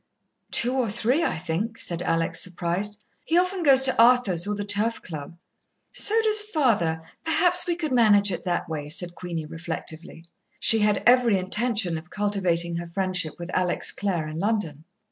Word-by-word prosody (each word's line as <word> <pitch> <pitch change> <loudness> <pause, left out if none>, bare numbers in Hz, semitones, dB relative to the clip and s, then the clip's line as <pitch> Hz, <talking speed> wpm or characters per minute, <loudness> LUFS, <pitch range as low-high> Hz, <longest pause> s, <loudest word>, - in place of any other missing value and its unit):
"Two 245 +2 +2
or 255 -4 -1
three, 240 +9 0
I - - -1
think," 180 +8 -4
said 170 -5 0
Alex, 165 -1 +1
surprised. 185 +4 -3 0.2
"He 330 - 0
often 365 +1 0
goes 270 -4 +4
to 260 -3 +3
Arthur's 230 -8 +3
or 210 - -2
the 205 0 -5
Turf 210 +3 0
Club." 160 0 -8 0.5
"So 440 +2 +3
does 430 -1 +4
father. 225 - 0 0.2
Perhaps 355 +2 +3
we 345 - 0
could 320 -4 -4
manage 210 -5 +4
it 175 - -5
that 175 -2 -2
way," 150 -2 -6
said 175 +2 -1
Queenie 170 -3 -6
reflectively. 165 +1 -7 0.3
She 225 - +4
had 210 -1 +1
every 245 -4 +4
intention 190 -2 0
of 170 +3 -18
cultivating 180 -5 0
her 170 0 -6
friendship 185 -2 -2
with 175 +1 -8
Alex 180 -1 +1
Clare 175 -6 -3
in 155 +1 -6
London. 175 -7 -2
200 Hz, 170 wpm, -24 LUFS, 170-240 Hz, 0.5 s, goes